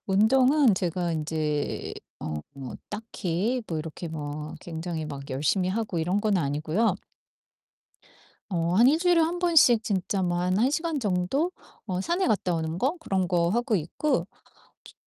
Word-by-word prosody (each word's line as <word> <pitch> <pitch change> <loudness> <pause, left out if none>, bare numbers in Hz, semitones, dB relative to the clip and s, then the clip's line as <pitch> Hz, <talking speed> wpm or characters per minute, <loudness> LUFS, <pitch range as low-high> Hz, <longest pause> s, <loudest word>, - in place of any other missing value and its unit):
운동은 255 +6 +4
제가 175 -1 -1
인제 155 -2 -2 0.3
어 80 -1 -4 0.2
뭐 135 -3 -7
딱히 210 +2 -2
뭐 165 - -2
이렇게 160 +2 -6
뭐 150 -1 -5
굉장히 165 -1 -5
막 140 -2 -7
열심히 155 +8 +1
하고 205 -2 -2
이런 180 +5 +1
건 210 -2 +2
아니고요. 160 +7 +1 1.5
어 170 -2 0
한 235 +5 +6
1 295 +4 +5
주일에 350 -1 +4
1 330 +2 0
번씩 315 -10 +5
진짜 195 -2 -1
뭐 175 -1 0
한 180 +1 +1
1 240 +5 +3
시간 320 0 -1
정도 215 - 0 0.3
어 185 -3 -2
산에 345 - 0
갔다 200 -5 +1
오는 160 0 -2
거 265 - +1
그런 190 - 0
거 170 -1 +2
하고 235 +2 +1
있고 175 - -1 0.6
주 - - -14
185 Hz, 250 characters per minute, -27 LUFS, 160-235 Hz, 1.5 s, 한